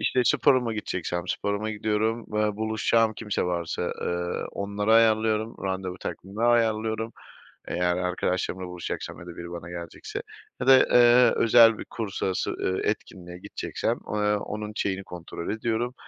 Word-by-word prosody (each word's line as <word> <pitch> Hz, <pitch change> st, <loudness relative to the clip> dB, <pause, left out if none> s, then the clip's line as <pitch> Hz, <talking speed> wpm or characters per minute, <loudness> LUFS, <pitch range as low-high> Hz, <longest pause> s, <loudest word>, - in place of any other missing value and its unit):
İşte, 130 Hz, -, +2 dB
sporuma 130 Hz, -4 st, +3 dB
gideceksem 90 Hz, -5 st, -3 dB
sporuma 100 Hz, +2 st, -1 dB
gidiyorum, 110 Hz, +2 st, -1 dB
ııı, 105 Hz, -1 st, +1 dB
buluşacağım 110 Hz, +1 st, +2 dB
kimse 105 Hz, -3 st, -2 dB
varsa, 85 Hz, -2 st, -2 dB
ııı, 85 Hz, 0 st, -2 dB
onları 100 Hz, +2 st, -1 dB
ayarlıyorum, 110 Hz, -1 st, +3 dB
randevu 95 Hz, -1 st, -3 dB
takvimimi 100 Hz, +5 st, -4 dB
ayarlıyorum. 110 Hz, -1 st, +1 dB, 0.6 s
Eğer 90 Hz, 0 st, +1 dB
arkadaşlarımla 90 Hz, 0 st, -1 dB
buluşacaksam 90 Hz, -1 st, -5 dB
ya 85 Hz, -, -11 dB
da 85 Hz, -, -9 dB
biri 85 Hz, 0 st, -7 dB
bana 85 Hz, 0 st, -7 dB
gelecekse 85 Hz, -1 st, -6 dB, 0.4 s
ya 125 Hz, -, -2 dB
da, 135 Hz, -1 st, +9 dB
eee, 120 Hz, 0 st, +6 dB
özel 115 Hz, -1 st, +6 dB
bir -, -, -6 dB
kurs 110 Hz, -4 st, -5 dB
sonrası, 95 Hz, -1 st, -1 dB
ııı, 95 Hz, -, -2 dB
etkinliğine 90 Hz, -4 st, -4 dB
gideceksem, -, -, -3 dB, 0.2 s
eee, 105 Hz, 0 st, +2 dB
onun 105 Hz, +1 st, -5 dB
şeyini 95 Hz, -1 st, -1 dB
kontrol 85 Hz, -1 st, -7 dB
ediyorum. 115 Hz, +3 st, -1 dB
105 Hz, 140 wpm, -26 LUFS, 90-110 Hz, 0.6 s, da